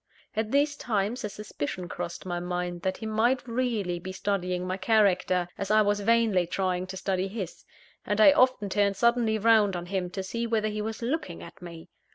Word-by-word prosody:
At 220 0 -1
these 285 +3 +2
times 225 -1 -1
a 210 - -2
suspicion 185 -3 -5
crossed 170 +1 -6
my 175 -1 -2
mind 180 0 -3
that 190 -1 -1
he 220 - -7
might 235 +4 +1
really 230 -7 -1
be 185 +2 -6
studying 185 -2 -2
my 185 0 -2
character, 190 -3 +2
as 195 - -3
I 215 0 +5
was 205 0 +1
vainly 215 -4 +2
trying 185 0 -1
to 190 0 -6
study 190 0 -1
his; 195 -3 -6 0.4
and 205 +1 -1
I 220 - +9
often 255 -6 +3
turned 200 0 +1
suddenly 235 0 +3
round 215 -3 +4
on 175 0 -4
him, 185 -1 -2
to 190 +2 -5
see 230 +5 -3
whether 220 -2 +1
he 210 0 -3
was 220 +2 -4
looking 305 +6 -3
at - - -13
me. 170 -1 -10
200 Hz, 200 wpm, -27 LUFS, 185-225 Hz, 0.4 s, I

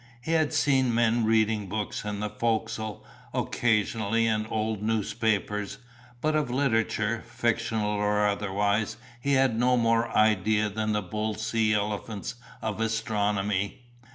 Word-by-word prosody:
He 140 +7 -4
had 160 -2 +2
seen 130 -4 +2
men 115 0 +3
reading 110 -2 +2
books 105 +1 -3
in 105 -1 -4
the 105 - -1
fo'c'sle 110 -1 -2 0.3
occasionally 115 0 +1
and 110 -1 0
old 110 -1 -1
newspapers, 110 +1 -1 0.4
but 155 0 +1
of 150 -4 +1
literature, 115 -3 0
fictional 115 -2 0
or 105 0 +1
otherwise, 105 +1 0 0.2
he 140 +2 +1
had 130 -3 +3
no 125 +1 +3
more 115 0 +2
idea 110 0 +3
than 110 +1 -1
the 105 -1 0
bull 105 +3 -2
sea 110 0 +1
elephants 105 +1 -3 0.3
of 110 0 -2
astronomy. 105 -2 -1
110 Hz, 130 wpm, -27 LUFS, 105-115 Hz, 0.4 s, men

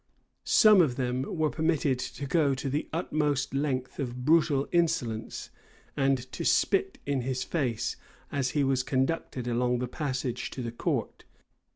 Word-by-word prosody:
[*] - - -50
Some 215 -3 +6
of 140 -7 +1
them 125 0 -1
were 155 +2 -1
permitted 155 -5 +1
to 140 - -5
go 140 -1 +2
the 140 +2 -3
utmost 150 -5 -1
length 135 -2 -2
of 125 -2 -4
brutal 150 -3 +3
insolence, 155 -10 -1 0.4
and 135 -1 +2
to - - -5
spit 390 0 +2
in 140 -2 0
his 130 +1 -2
face, 130 -9 -1 0.3
as 135 -2 0
he 145 - +3
was 135 -1 +2
conducted 130 -1 -1
along 125 +1 +1
the 125 +1 -2
passage 130 -2 -3
to 130 - -6
the 115 - -3
court. 120 - -2
135 Hz, 155 wpm, -28 LUFS, 125-155 Hz, 0.4 s, Some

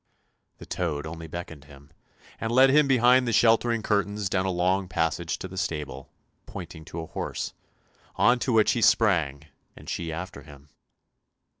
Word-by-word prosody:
" - - -49
The - - -11
toad 80 -4 -3
only 80 +1 -7
beckoned 80 -3 -8
him, 70 0 -16 0.5
and 115 - -3
led 130 +2 +6
him 150 0 +5
behind 125 -1 +4
the - - +1
shelter 115 +1 +4
ing 115 -2 -2
curtains 100 -1 0
down 95 +1 0
a - - +1
long 90 +1 0
passage 80 -1 -1
to - - -7
the 95 0 -6
stable, 75 -7 -4 0.4
pointed 80 -3 -9
to 85 - -6
a - - -6
horse, - - -5 0.6
on 120 +1 +4
to 125 - -1
which 110 -2 +4
he 120 - -1
sprang 85 -10 +3 0.3
and - - -14
she 85 -1 -4
after 85 +4 -6
him. 70 -1 -15
90 Hz, 175 wpm, -26 LUFS, 80-115 Hz, 0.6 s, led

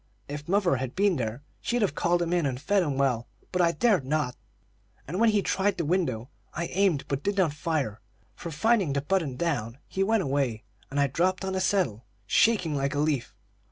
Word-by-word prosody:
If 145 +2 -7
mother 190 -7 +3
had 130 -1 -4
been 195 -3 +3
there, 120 +2 -3 0.2
she'd 240 -2 0
have 200 - +1
called 175 0 +1
him 170 +1 -1
in 170 -5 +2
and 125 -2 -3
fed 200 +7 +2
him 145 -6 -1
well, 125 -4 +1 0.2
but 180 - +1
I 170 -1 +4
dared 195 - +2
not, 140 -2 -1 0.7
and 175 +7 -3
when 230 0 +5
he 210 -2 +2
tried 195 +1 +1
the 170 - -1
window 145 -9 0 0.3
I 170 - -1
aimed, 185 -6 +1
but 140 0 -2
did 200 +5 -1
not 175 -6 +3
fire; 145 - -2 0.3
for 170 - -7
finding 190 0 +2
the 140 - 0
button 155 -4 0
down 125 -6 -2
he 190 - -3
went 215 +1 +2
away, 135 -6 -1 0.3
and 145 - -2
I 140 - +5
dropped 180 +7 0
on 190 - -2
the 190 - 0
settle, 180 - +1 0.2
shaking 180 - +3
like 140 +1 -1
a - - 0
leaf. 145 -5 0
160 Hz, 210 wpm, -27 LUFS, 135-190 Hz, 0.7 s, when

